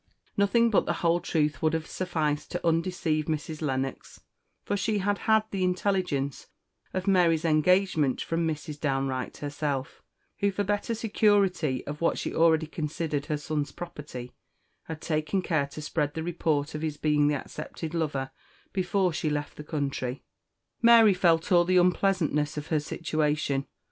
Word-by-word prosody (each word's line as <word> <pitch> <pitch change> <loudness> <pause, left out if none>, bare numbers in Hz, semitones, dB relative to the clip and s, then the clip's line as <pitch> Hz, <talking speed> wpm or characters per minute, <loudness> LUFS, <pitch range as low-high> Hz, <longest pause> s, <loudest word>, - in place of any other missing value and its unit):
Nothing 230 +4 +3
but 205 - +3
the - - +1
whole 170 +1 +4
truth 150 -3 0
would 155 0 +2
have 160 -1 -1
sufficed 160 -6 -2
to 175 -1 -3
undeceive 165 -2 0
Mrs. 155 0 -3
Lennox, 135 -2 -3 0.4
for 205 - -1
she 210 +1 0
had 205 +1 0
had 220 0 +5
the 195 -2 -1
intelligence 180 -7 -1 0.4
of 185 0 -3
Mary's 175 -5 +3
engagement 160 -3 +3
from 165 0 -1
Mrs. 150 -1 -4
Downe 135 -2 0
Wright 130 -1 -4
herself, 145 0 -3 0.4
who, 200 - +2
for 205 +1 -1
better 205 +3 -1
security 200 - +2
of 150 +2 -6
what 170 - +2
she - - -3
already 160 -1 +4
considered 155 -1 -3
her 150 - 0
son's 150 0 -3
property, 145 -7 -8 0.5
had 160 -1 -7
taken 155 +4 -1
care 155 -6 +1
to 150 +2 -8
spread 150 -1 -1
the 160 - -3
report 160 -3 -1
of 150 - -4
his 155 -2 -3
being 150 -1 +2
the 150 - +2
accepted 155 +3 -6
lover 145 -5 -2 0.4
before 185 -1 +1
she 155 - -1
left 150 0 -3
the 150 - -8
country. 140 -4 -3 0.6
Mary 230 -3 +7
felt 170 -2 +2
all 175 -1 +6
the 185 +1 +2
unpleasantness 175 -5 +2
of 150 - -5
her 155 - +2
situation. 150 -3 -1
160 Hz, 160 wpm, -27 LUFS, 150-180 Hz, 0.6 s, Mary